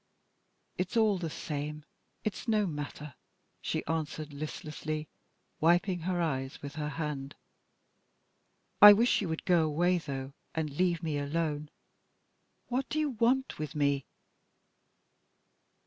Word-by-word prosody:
"It's 185 Hz, +5 st, -1 dB
all 215 Hz, -4 st, +4 dB
the 165 Hz, -2 st, -3 dB
same. 150 Hz, 0 st, -5 dB, 0.4 s
It's 215 Hz, +3 st, -3 dB
no 215 Hz, -2 st, +3 dB
matter," 150 Hz, -3 st, -5 dB, 0.5 s
she -, -, -2 dB
answered, 155 Hz, -1 st, -3 dB
listlessly, 155 Hz, +1 st, -5 dB, 0.5 s
wiping 175 Hz, +3 st, +3 dB
her 175 Hz, +1 st, -1 dB
eyes 135 Hz, -5 st, -2 dB
with 140 Hz, 0 st, -6 dB
her 150 Hz, -1 st, -3 dB
hand. 145 Hz, -3 st, -4 dB, 1.5 s
"I 205 Hz, 0 st, +13 dB
wish 230 Hz, +3 st, +3 dB
you 190 Hz, -, -2 dB
would 160 Hz, -, -3 dB
go 175 Hz, -3 st, +4 dB
away, 175 Hz, +4 st, +2 dB
though, 135 Hz, -3 st, -5 dB, 0.2 s
and 160 Hz, -2 st, -1 dB
leave 175 Hz, 0 st, +1 dB
me 155 Hz, -3 st, -1 dB
alone. 150 Hz, 0 st, -2 dB, 1.0 s
What 255 Hz, +2 st, -2 dB
do 310 Hz, -, -2 dB
you 305 Hz, -2 st, +1 dB
want 250 Hz, -, +1 dB
with 155 Hz, 0 st, -4 dB
me?" 140 Hz, -2 st, +1 dB
160 Hz, 125 wpm, -31 LUFS, 150-185 Hz, 1.5 s, I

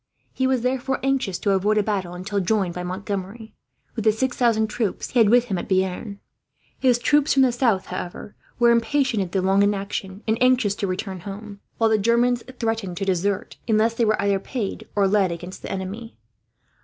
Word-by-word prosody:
He 260 Hz, -, 0 dB
was 260 Hz, -2 st, +1 dB
therefore 260 Hz, +2 st, -1 dB
anxious 265 Hz, -9 st, 0 dB
to 200 Hz, -, 0 dB
avoid 200 Hz, +3 st, +2 dB
a 210 Hz, -, +3 dB
battle 190 Hz, -4 st, -2 dB
until 200 Hz, +3 st, -2 dB
joined 190 Hz, -2 st, 0 dB
by 180 Hz, -, -5 dB
Montgomery, 200 Hz, +4 st, -5 dB, 0.4 s
with 225 Hz, -, -3 dB
the 215 Hz, -, +5 dB
six 245 Hz, +3 st, -1 dB
thousand 230 Hz, -3 st, +2 dB
troops 215 Hz, -2 st, -3 dB
he 250 Hz, -, +2 dB
had 220 Hz, -3 st, +6 dB
with 245 Hz, +1 st, +5 dB
him 195 Hz, -6 st, -2 dB
at -, -, -7 dB
Bearn. 190 Hz, +2 st, -1 dB, 0.6 s
His 250 Hz, -3 st, +4 dB
troops 290 Hz, +5 st, +3 dB
from 270 Hz, -, +6 dB
the 255 Hz, -, +4 dB
south, 235 Hz, -6 st, +1 dB
however, 180 Hz, +3 st, -7 dB, 0.2 s
were 240 Hz, -1 st, +5 dB
impatient 235 Hz, 0 st, +1 dB
at 185 Hz, -2 st, -4 dB
the 190 Hz, -1 st, 0 dB
long 195 Hz, +1 st, +3 dB
inaction, 200 Hz, 0 st, -2 dB
and 220 Hz, +2 st, 0 dB
anxious 250 Hz, -5 st, +3 dB
to 200 Hz, -, -1 dB
return 190 Hz, 0 st, -4 dB
home; 200 Hz, +2 st, -8 dB, 0.2 s
while 225 Hz, -1 st, +3 dB
the 215 Hz, -, +3 dB
Germans 235 Hz, +3 st, +2 dB, 0.2 s
threatened 225 Hz, -6 st, -2 dB
to 195 Hz, -, -2 dB
desert, 190 Hz, +1 st, -1 dB
unless 220 Hz, 0 st, +3 dB
they 230 Hz, -, 0 dB
were 215 Hz, 0 st, +1 dB
either 200 Hz, -1 st, +1 dB
paid 210 Hz, 0 st, -5 dB
or 200 Hz, -1 st, +3 dB
led 195 Hz, -2 st, +2 dB
against 175 Hz, +2 st, -7 dB
the -, -, -6 dB
enemy. 195 Hz, +5 st, -6 dB
210 Hz, 200 wpm, -23 LUFS, 195-235 Hz, 0.6 s, had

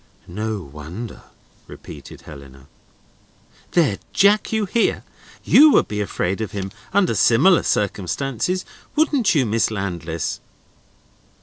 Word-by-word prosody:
"No 105 Hz, +4 st, -4 dB
wonder," 80 Hz, -, -9 dB, 0.5 s
repeated -, -, -12 dB
Helena. 70 Hz, -2 st, -13 dB, 1.1 s
"There, 150 Hz, -, +2 dB
Jack, 205 Hz, +2 st, +3 dB
you 220 Hz, -1 st, 0 dB
hear! 225 Hz, +4 st, 0 dB, 0.4 s
You 305 Hz, +2 st, +7 dB
would -, -, +4 dB
be 105 Hz, 0 st, -3 dB
afraid 95 Hz, 0 st, -2 dB
of 110 Hz, -, -4 dB
him, 95 Hz, -1 st, -4 dB, 0.2 s
under 190 Hz, -7 st, +2 dB
similar 115 Hz, -, +4 dB
circumstances, 125 Hz, -, -1 dB, 0.3 s
wouldn't 290 Hz, -, +2 dB
you, 135 Hz, -4 st, +3 dB
Miss 115 Hz, +1 st, +1 dB
Landless?" 85 Hz, -6 st, -4 dB
110 Hz, 110 wpm, -21 LUFS, -, 1.1 s, You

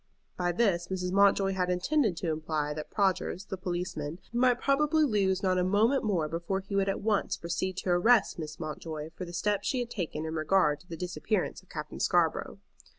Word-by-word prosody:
By 175 Hz, -1 st, 0 dB
this 175 Hz, -3 st, +1 dB
Mrs. 180 Hz, -1 st, -2 dB
Mountjoy 195 Hz, 0 st, +4 dB
had 180 Hz, -1 st, 0 dB
intended 195 Hz, -, +1 dB
to 170 Hz, -1 st, -1 dB
imply 155 Hz, -1 st, -2 dB
that 155 Hz, 0 st, -6 dB
Prodgers, 195 Hz, -1 st, 0 dB
the -, -, -2 dB
policeman, 175 Hz, -4 st, -4 dB, 0.2 s
might 245 Hz, 0 st, +3 dB
probably 300 Hz, +3 st, +3 dB
lose 195 Hz, -7 st, +1 dB
not 185 Hz, -1 st, +2 dB
a -, -, +2 dB
moment 215 Hz, +8 st, +3 dB
more 185 Hz, -8 st, +1 dB
before 170 Hz, +4 st, -2 dB
he 200 Hz, +1 st, -6 dB
would 195 Hz, 0 st, +2 dB
at 195 Hz, -, -2 dB
once 210 Hz, -1 st, 0 dB
proceed 175 Hz, +2 st, -3 dB
to 180 Hz, -, 0 dB
arrest 220 Hz, +3 st, +4 dB
Miss 155 Hz, -1 st, -6 dB
Mountjoy 155 Hz, 0 st, -5 dB
for 185 Hz, -, -5 dB
the 175 Hz, -, -9 dB
steps 205 Hz, +3 st, 0 dB
she 265 Hz, -, 0 dB
had 240 Hz, -1 st, -3 dB
taken 160 Hz, -5 st, -3 dB
in 160 Hz, -, -4 dB
regard 155 Hz, -1 st, +2 dB
to 180 Hz, -, -20 dB
the 165 Hz, -, -7 dB
disappearance 180 Hz, +4 st, -2 dB
of -, -, -28 dB
Captain -, -, -6 dB
Scarborough. -, -, +1 dB
185 Hz, 200 wpm, -29 LUFS, 170-205 Hz, 0.2 s, Mountjoy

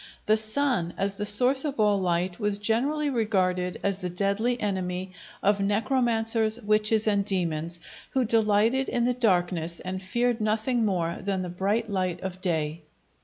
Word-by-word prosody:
The 215 Hz, -, +4 dB
sun, 215 Hz, -5 st, -1 dB
as 195 Hz, 0 st, -1 dB
the 210 Hz, +1 st, -2 dB
source 255 Hz, +6 st, +4 dB
of 285 Hz, -6 st, -4 dB
all 210 Hz, -2 st, +3 dB
light, 180 Hz, +1 st, -1 dB
was 210 Hz, -2 st, 0 dB
generally 275 Hz, +8 st, 0 dB
regarded 185 Hz, -6 st, 0 dB
as 200 Hz, -1 st, 0 dB
the 180 Hz, -, -3 dB
deadly 200 Hz, +7 st, 0 dB
enemy 185 Hz, -2 st, -3 dB, 0.3 s
of 205 Hz, 0 st, +3 dB
necromancers, 225 Hz, +1 st, +1 dB
witches, 215 Hz, 0 st, +2 dB
and 205 Hz, -2 st, +2 dB
demons, 170 Hz, -4 st, -1 dB, 0.3 s
who 260 Hz, -2 st, 0 dB
delighted 225 Hz, +4 st, +2 dB
in 240 Hz, -1 st, 0 dB
the 250 Hz, -, +2 dB
darkness 175 Hz, -7 st, 0 dB
and 185 Hz, +1 st, -5 dB
feared 235 Hz, +4 st, 0 dB
nothing 220 Hz, +2 st, +1 dB
more 170 Hz, -4 st, -1 dB
than 195 Hz, -1 st, -2 dB
the 180 Hz, -, -5 dB
bright 200 Hz, +6 st, -1 dB
light 185 Hz, -4 st, -2 dB
of 185 Hz, -1 st, -5 dB
day. 160 Hz, -3 st, -1 dB
205 Hz, 160 wpm, -26 LUFS, 185-225 Hz, 0.3 s, The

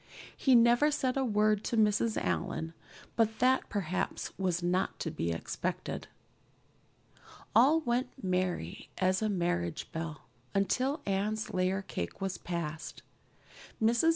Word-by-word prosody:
He 265 Hz, -2 st, +4 dB
never 240 Hz, +5 st, +6 dB
said 265 Hz, -4 st, 0 dB
a 270 Hz, -, +1 dB
word 215 Hz, -3 st, +2 dB
to 235 Hz, -, -1 dB
Mrs. 215 Hz, +1 st, +3 dB
Allan, 90 Hz, -, -2 dB, 0.4 s
but 220 Hz, -1 st, +2 dB
that 260 Hz, +1 st, +3 dB
perhaps 185 Hz, -3 st, -2 dB
was 180 Hz, -2 st, -1 dB
not 180 Hz, +2 st, 0 dB
to -, -, -2 dB
be 85 Hz, -, -2 dB
expected. 85 Hz, -, -3 dB, 1.5 s
All 280 Hz, +8 st, +6 dB
went 245 Hz, -1 st, 0 dB, 0.2 s
merry 180 Hz, -, -1 dB
as 185 Hz, +1 st, +2 dB
a 215 Hz, -, +1 dB
marriage 175 Hz, -3 st, -1 dB
bell 160 Hz, -3 st, -5 dB, 0.3 s
until 255 Hz, +9 st, +1 dB
Anne's 205 Hz, +2 st, -1 dB
layer 185 Hz, +1 st, +1 dB
cake 85 Hz, -, -5 dB
was 195 Hz, -1 st, -3 dB
passed. 165 Hz, -3 st, -5 dB, 0.8 s
Mrs. 235 Hz, +8 st, +4 dB
195 Hz, 125 wpm, -31 LUFS, 175-235 Hz, 1.5 s, never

